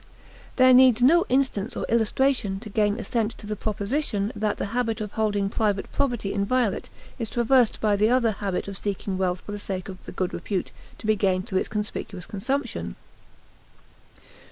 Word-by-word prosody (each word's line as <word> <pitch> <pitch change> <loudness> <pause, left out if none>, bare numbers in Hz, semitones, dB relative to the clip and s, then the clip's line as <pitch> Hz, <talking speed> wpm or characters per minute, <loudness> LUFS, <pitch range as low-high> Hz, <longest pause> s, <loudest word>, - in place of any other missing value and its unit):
There 255 0 +6
needs 250 -2 +6
no 340 +7 +5
insistence 250 -4 0
or - - -2
illustration 230 -2 +1
to 220 - -8
gain 205 0 +2
assent 230 -2 -2
to - - -11
the 210 0 -3
proposition 210 +1 -1
that 210 0 -1
the - - -2
habit 230 -3 0
of 210 -2 -4
holding 205 -2 0
private 205 -1 -1
property 240 -8 -1
inviolate 205 +1 0 0.3
is 225 -2 -3
traversed 240 0 +3
by 210 -2 +2
the 210 +2 +3
other 245 -2 +3
habit 200 -3 -3
of 200 -1 -6
seeking 200 -1 -3
wealth 185 -1 0
for - - -9
the 205 - -4
sake 190 -2 -4
of 185 -1 -9
the - - -6
good 185 -1 -2
repute 195 -4 -3 0.3
to - - -11
be 215 0 +3
gained 190 -2 +1
through 190 -5 0
its - - -3
conspicuous 210 -3 -4
consumption. 270 +8 -3
215 Hz, 180 wpm, -25 LUFS, 200-240 Hz, 0.3 s, There